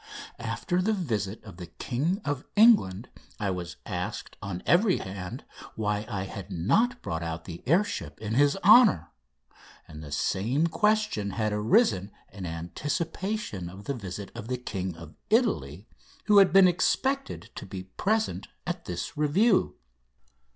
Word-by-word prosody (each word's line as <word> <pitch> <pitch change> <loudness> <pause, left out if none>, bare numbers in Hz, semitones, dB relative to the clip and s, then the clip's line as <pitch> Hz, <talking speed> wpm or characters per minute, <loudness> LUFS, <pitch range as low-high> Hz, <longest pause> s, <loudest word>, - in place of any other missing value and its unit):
After 180 -1 -1
the 220 +4 +1
visit 110 - -2
of 100 -6 -12
the 90 -2 -8
King 155 - -2
of 145 -2 -2
England 205 - +5 0.3
I 100 -3 0
was 90 -2 -5
asked - - -4
on 95 -3 -5
every 185 +2 +4
hand 95 -1 -7 0.3
why 105 0 -1
I 100 -4 -2
had 95 0 -7
not 225 - +1
brought 80 +1 -3
out 80 0 -5
the 85 -2 -8
air 170 +9 +5
ship - - -6
in 110 0 -4
his 145 +6 +3
honour, 210 - +6 0.8
and 75 0 -10
the 75 - -9
same 115 - +1
questions 210 - +1
had 110 -2 0
arisen 105 - +3 0.2
in 95 -2 -6
anticipation 145 - -3
of 95 +3 -11
the 140 - -2
visit 100 -4 -7
of 105 - -8
the 125 0 -2
King 95 -7 -4
of 80 -1 -11 0.2
Italy, 95 - +1 0.4
who 210 -1 +6
had 195 - +6
been 195 -1 +7
expected 270 +10 0
to - - -8
be 95 -1 -6
present 215 - -1 0.2
at 175 -1 -4
this - - -5
review. 180 +9 +3
110 Hz, 150 wpm, -27 LUFS, -, 0.8 s, been